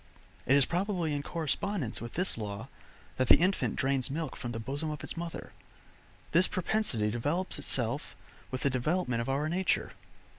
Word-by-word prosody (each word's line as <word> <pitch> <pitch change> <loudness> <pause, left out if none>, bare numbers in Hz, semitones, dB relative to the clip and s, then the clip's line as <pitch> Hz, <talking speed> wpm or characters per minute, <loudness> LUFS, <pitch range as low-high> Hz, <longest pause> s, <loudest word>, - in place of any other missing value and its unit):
It 135 - +6
is 140 -2 +5
probably 175 -3 -1
in 145 - -1
correspondence 165 - -2
with 115 0 -7
this 180 +3 +4
law 105 +2 -5 0.5
that 130 - +1
the - - +9
infant 185 +3 +1
drains 135 -1 +1
milk 155 0 -3
from 120 - -5
the 115 - -4
bosom 140 +7 -2
of 150 -3 -5
its - - -5
mother; 170 0 -6 0.8
this 180 +3 +5
propensity 175 - +1
develops 145 - -1
itself 130 -1 +1 0.3
with 130 - -4
the 140 - +2
development 130 -1 0
of 115 - -4
our 140 +3 +1
nature. 180 +3 0
145 Hz, 170 wpm, -31 LUFS, 125-170 Hz, 0.8 s, the